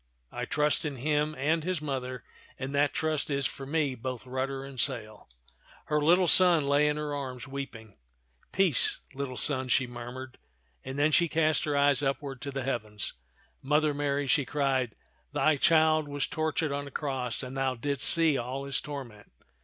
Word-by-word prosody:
I - - -4
trust 150 0 +1
in 150 -3 -3
him 150 +3 0
and 155 +4 0
his 180 -1 -1
Mother, 130 -4 -4 0.3
and 135 +1 -5
that 145 0 +2
trust 155 -2 -1
is 140 -1 -1
for 135 +1 -4
me 145 -2 0
both 130 0 -6
rudder 135 +1 -3
and 135 -2 -9
sail." 110 - -3 0.6
Her 150 0 0
little 175 +4 +4
son 175 -4 +7
lay 145 +1 +3
in 150 0 0
her 150 -1 -3
arms 130 -4 -5
weeping. 125 - -8 0.5
"Peace, 185 -8 +2 0.2
little 135 -2 -5
son," 130 -3 +1
she 130 +1 +2
murmured; 120 +1 -8 0.4
and 130 +1 -6
then 145 +2 +3
she 170 +3 +4
cast 155 +1 +1
her 145 -1 0
eyes 140 -1 +4
upward 135 -1 -3
to 140 - -5
the 135 -1 -4
heavens. 110 -5 -3 0.5
"Mother 150 +2 +2
Mary," 145 0 -1
she 140 +2 +3
cried, 135 -4 -1 0.4
"thy 155 -1 +3
Child 155 0 +4
was 145 -1 -2
tortured 155 0 -1
on 140 0 -3
a - - -7
cross, 130 -4 -3
and 130 +1 -7
thou 135 -1 0
didst 140 +2 +2
see 160 -4 +5
all 130 +3 -4
his 140 - -2
torment. 125 -8 -8
140 Hz, 175 wpm, -29 LUFS, 130-150 Hz, 0.6 s, son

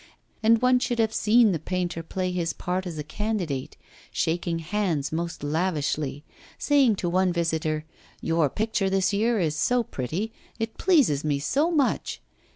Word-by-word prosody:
And 225 +1 +4
one 250 0 +5
should 245 -1 -1
have 220 -1 +1
seen 220 0 +4
the 165 - -1
painter 175 +1 -2
play 185 +2 -3
his 170 -2 -1
part 185 +1 -3
as 165 -3 -6
a 150 - -3
candidate, 170 -5 -3 0.3
shaking 170 +1 -1
hands 165 -4 -1
most 170 -1 -3
lavishly, 150 -3 -1 0.3
saying 275 -7 +3
to 185 - -3
one 185 +1 +2
visitor: 160 -2 -1 0.3
'Your 165 -3 +1
picture 210 - 0
this 190 +1 +1
year 225 +2 +2
is 155 -4 0
so 245 +10 +2
pretty, 185 - -4 0.2
it 225 -1 -4
pleases 275 - +3
me 150 -2 +1
so 280 - +1
much! 300 -6 0
180 Hz, 160 wpm, -26 LUFS, 160-220 Hz, 0.3 s, one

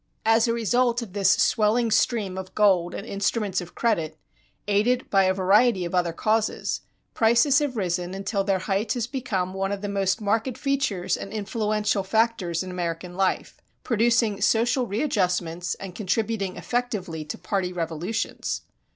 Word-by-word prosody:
As 225 +2 +4
a 230 - +1
result 240 +1 +1
of 200 -6 -11
this 200 -2 +2
swelling 225 +3 +3
stream 215 -3 +1
of 190 0 -7
gold 190 -4 +3
and 200 - -6
instruments 200 -2 -1
of 175 - -11
credit, 165 -10 0 0.5
aided 230 +5 +2
by 195 -1 +4
a 185 - +3
variety 195 +1 +3
of 170 - -5
other 175 -2 +1
causes, 215 +5 0 0.3
prices 235 +5 +4
have 285 -5 -2
risen 180 -1 -2
until 195 +1 -1
their 195 -1 +1
height 210 +3 0
has 240 -3 -1
become 230 -8 -3
one 195 +1 -2
of 200 -1 -3
the 205 - -3
most 195 +1 0
marked 225 +4 0
features 275 -10 0
and 195 - -7
influential 210 -1 -1
factors 190 -4 0
in 185 - -7
American 175 0 -4
life, 190 0 -1 0.2
producing 230 -3 +2
social 235 +4 +2
readjustments 180 - -1
and 195 -2 -8
contributing 205 -1 -1
effectively 210 -10 -3
to 150 - -6
party 180 0 -2
revolutions. 175 +4 -3
205 Hz, 155 wpm, -25 LUFS, 185-230 Hz, 0.5 s, As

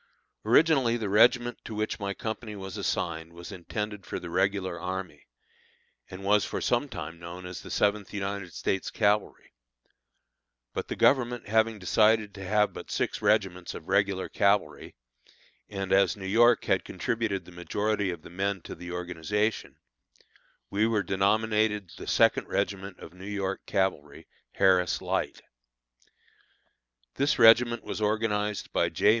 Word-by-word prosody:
Originally 125 0 +4
the 110 -4 -3
regiment 120 +3 +4
to 110 - -7
which 110 +2 -2
my 100 -1 -2
company 110 -1 -5
was 95 -2 -7
assigned 85 -1 -3
was 85 +1 -10
intended 105 +3 -5
for - - -5
the 85 - -7
regular 95 -2 0
army, 95 +1 -6 0.8
and 95 +1 -9
was 105 +1 +3
for - - -3
some - - 0
time 85 +1 -7
known 85 +2 -8
as 90 0 -7
the - - -11
Seventh 105 -1 0
United 100 -2 -4
States 95 +3 -2
Cavalry; 105 - 0 1.2
but - - -4
the - - -4
Government 120 -4 +2
having 110 +1 +2
decided 105 +2 +2
to 100 -2 -9
have 105 +2 +2
but - - -9
six - - -2
regiments 90 -2 +1
of 80 - -9
regular 100 -1 +1
cavalry, 100 -8 0 0.7
and 95 -2 -3
as 95 +1 +3
New 95 - -8
York 115 +4 +4
had - - +1
contributed 110 -6 -2
the 90 - -13
majority 100 +3 -1
of 85 -3 -6
the - - -12
men 100 +2 -1
to - - -8
the 90 0 -8
organization, 90 +5 -2 0.9
we 105 +3 +2
were 110 -3 +1
denominated 105 0 +1
the - - -9
Second - - +3
Regiment 100 -1 -2
of - - -12
New 90 +1 -13
York 95 -1 -3
Cavalry, 80 -6 -1 0.3
"Harris 90 -2 +3
Light." - - -2 1.7
This 145 +1 +2
regiment 120 0 +6
was - - -5
organized 105 -1 -1
by - - +2
J. 105 - +2
100 Hz, 150 wpm, -28 LUFS, 95-110 Hz, 1.7 s, regiment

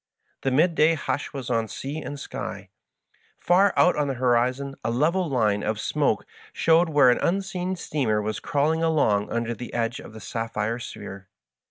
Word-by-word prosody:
The 135 - 0
midday 160 +3 +3
hush 145 - -3
was 135 -4 -5
on 115 -1 +1
sea 140 +8 -5
and 145 - -6
sky. - - -6 0.7
Far 190 +3 +4
out 180 - +5
on 150 -1 0
the 135 - -2
horizon 125 +2 +1
a 110 - -1
level 160 +9 +1
line 105 -6 +1
of 110 -1 -2
smoke 140 -4 0 0.3
showed 165 +1 +3
where 145 -5 +6
an - - +1
unseen 185 0 -1
steamer 135 -11 -1
was 105 0 -3
crawling 155 +3 0
along 145 -11 +2
under 115 0 -2
the 120 +2 -8
edge 115 0 -1
of - - -11
the 110 - -9
sapphire 115 +2 -3
sphere. 100 -4 -8
135 Hz, 170 wpm, -25 LUFS, 115-160 Hz, 0.7 s, where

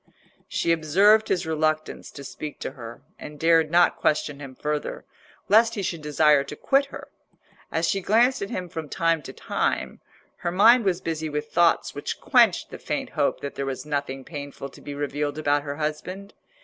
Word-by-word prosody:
She 170 - 0
observed 195 +7 +4
his 175 -1 0
reluctance 155 -1 -1
to 140 - -9
speak 150 +2 -7
to - - -4
her, 120 -3 -10 0.2
and 150 -1 -9
dared 165 -1 +4
not 175 +1 +4
question 150 -3 0
him 135 -2 -9
further, 150 +1 -3 0.4
lest 225 +2 +5
he 200 - -3
should 170 -3 -3
desire 150 -1 +3
to 140 - -8
quit 275 - +2
her. 275 - -10 0.6
As 165 +1 0
she 195 - 0
glanced 235 +7 +3
at 200 - -3
him 180 -1 -4
from 160 -3 -7
time 165 +1 +1
to - - -9
time, - - -2 0.4
her 170 - -3
mind 225 +5 +6
was 185 -2 +1
busy 160 -1 -3
with 150 0 -4
thoughts 170 -1 +3
which - - -5
quenched - - +3
the - - -8
faint - - -4
hope - - 0
that 140 - -5
there 140 - -4
was 135 +2 -4
nothing 140 -3 -3
painful 145 -2 -7
to - - -16
be 145 - -7
revealed 145 0 -2
about 145 -1 +1
her 145 0 -5
husband. 170 +6 -5
155 Hz, 190 wpm, -25 LUFS, 145-180 Hz, 0.6 s, mind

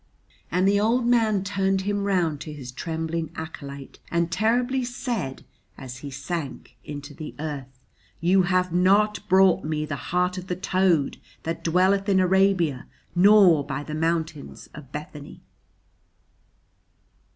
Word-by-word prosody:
And 180 +3 +2
the 200 0 +3
old 235 +4 +2
man 220 -5 +2
turned 195 -1 0
him 205 +1 -1
round 170 -7 0
to 155 - -6
his 135 -4 -8
trembling 160 +3 -3
acolyte 140 -4 -8
and 170 0 0
terribly 245 +7 +1
said 240 - -4 0.3
as 130 -1 -8
he 140 +2 -8
sank 140 -2 -6
into 145 0 -8
the 150 +1 -8
earth: 145 -3 -5 0.5
"YOU 180 +3 +4
HAVE 180 -1 +1
NOT 205 +3 +2
BROUGHT 190 -1 +5
ME 155 0 -2
THE 145 -4 -6
HEART 180 +1 +1
OF 185 - -10
THE 180 - -2
TOAD 185 -5 +1 0.3
THAT 165 +1 -4
DWELLETH 190 +4 +2
IN 190 -1 +4
ARABIA 185 -7 +2 0.3
NOR 185 -4 +6
BY 140 0 -4
THE 150 - -7
MOUNTAINS 160 -1 -3
OF 140 -3 -12
BETHANY!" 150 -1 -9
175 Hz, 140 wpm, -25 LUFS, 150-195 Hz, 0.5 s, NOR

